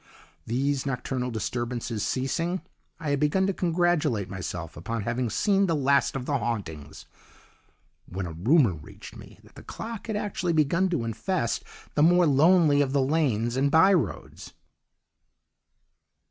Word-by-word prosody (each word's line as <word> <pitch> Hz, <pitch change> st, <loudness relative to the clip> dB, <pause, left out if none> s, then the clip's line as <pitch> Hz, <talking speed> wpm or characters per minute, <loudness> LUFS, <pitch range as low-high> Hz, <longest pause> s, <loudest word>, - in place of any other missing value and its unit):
"These 135 Hz, +4 st, 0 dB
nocturnal 125 Hz, -1 st, -2 dB
disturbances 120 Hz, -1 st, -3 dB
ceasing, 170 Hz, +7 st, -2 dB, 0.4 s
I 155 Hz, -3 st, -3 dB
had 140 Hz, -, +1 dB
begun 150 Hz, +6 st, +2 dB
to 195 Hz, -, 0 dB
congratulate 170 Hz, -, 0 dB
myself 90 Hz, -3 st, -6 dB
upon 115 Hz, +6 st, -4 dB
having 120 Hz, +2 st, -1 dB
seen 195 Hz, -, +2 dB
the 165 Hz, -, +1 dB
last 140 Hz, -1 st, +2 dB
of 130 Hz, -2 st, -4 dB
the 140 Hz, -1 st, 0 dB
hauntings, 90 Hz, -11 st, -5 dB, 1.0 s
when 95 Hz, +1 st, -5 dB
a 85 Hz, -, -6 dB
rumour 115 Hz, -, +3 dB
reached 75 Hz, -2 st, -12 dB
me -, -, -13 dB
that -, -, -20 dB
the -, -, -12 dB
clock 225 Hz, -1 st, -7 dB
had 220 Hz, -, -2 dB
actually 190 Hz, -4 st, -2 dB
begun 165 Hz, +5 st, +2 dB
to 170 Hz, -9 st, -1 dB
infest 115 Hz, -, -2 dB, 0.3 s
the -, -, +1 dB
more 175 Hz, +3 st, +5 dB
lonely 150 Hz, 0 st, +4 dB
of 135 Hz, -1 st, 0 dB
the 140 Hz, -, +3 dB
lanes 130 Hz, -6 st, 0 dB
and 135 Hz, +2 st, +2 dB
by 165 Hz, +6 st, +5 dB
roads. 155 Hz, -, -3 dB
140 Hz, 145 wpm, -26 LUFS, 115-170 Hz, 1.0 s, more